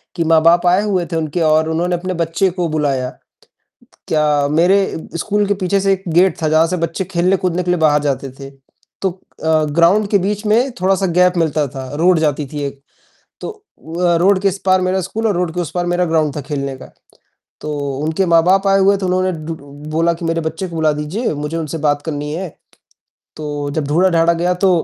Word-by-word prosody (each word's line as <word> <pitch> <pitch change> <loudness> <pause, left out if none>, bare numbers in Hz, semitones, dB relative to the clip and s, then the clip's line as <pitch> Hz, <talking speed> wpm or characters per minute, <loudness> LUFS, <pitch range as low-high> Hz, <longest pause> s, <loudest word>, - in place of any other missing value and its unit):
कि 170 - 0
माँ-बाप 165 +2 +4
आए 180 +3 +4
हुए 190 -4 0
थे - - -2
उनके 160 +1 -2
और 155 0 +3
उन्होंने 175 +2 0
अपने 185 +2 -4
बच्चे 170 +3 0
को 175 -1 -2
बुलाया। 140 -5 -1 1.0
क्या 155 -1 +1 0.3
मेरे 175 +5 +4 0.4
स्कूल 205 +5 0
के 205 - +2
पीछे 195 0 0
से 195 0 +3
एक 190 0 -5
गेट 180 +1 +3
था 155 - +1
जहाँ 160 +1 +4
से 180 +2 -2
बच्चे 165 +2 -2
खेलने 180 +3 +2
कूदने 180 -1 -1
के 180 - 0
लिए 180 - 0
बाहर 150 -2 +3
जाते 135 -2 -2
थे। 135 0 -8 0.5
तो 195 - +1 0.3
अ, 160 -1 +2 0.2
ग्राउंड 195 +5 +4
के 205 - +5
बीच 210 +1 -3
में 235 +6 +2
थोड़ा-सा 195 +1 +2
गैप 180 0 +4
मिलता 155 -3 +1
था। 130 -1 -6
रोड 170 +2 +3
जाती 150 -2 0
थी 145 -1 -3
एक 140 0 -10 0.6
तो - - -4
अ, 175 - -3
रोड 190 +3 +3
के 200 - +2
इस 195 - -1
पार 185 0 +4
मेरा 185 +1 0
स्कूल 220 +5 -2
और 205 - 0
रोड 175 -2 -1
के 180 - 0
उस 165 -3 -5
पार 175 0 0
मेरा 175 +1 +1
ग्राउंड 155 -3 0
था 150 - -3
खेलने 140 -2 -3
का। - - -13 0.7
तो 150 - -4 0.3
उनके 160 +5 0
माँ-बाप 180 +4 +3
आए 195 0 +4
हुए 200 +1 +4
तो 190 -1 -2
डु 180 - +1
उन्होंने 165 -5 -3 0.2
बोला 165 +2 +2
कि 170 +1 -8
मेरे 165 0 0
बच्चे 170 +4 -4
को 170 - -9
बुला 160 -1 +2
दीजिए, 150 +11 -3
मुझे 150 +2 -4
उनसे 165 0 -4
बात 145 -1 +1
करनी 150 -2 -4
है। 185 +3 -4 0.9
तो 145 -1 -4
जब 150 0 -2
ढूढ़ा-ढांडा 170 +1 +3
गया 175 +2 0
तो 190 +2 +1
170 Hz, 215 wpm, -17 LUFS, 155-185 Hz, 1.0 s, के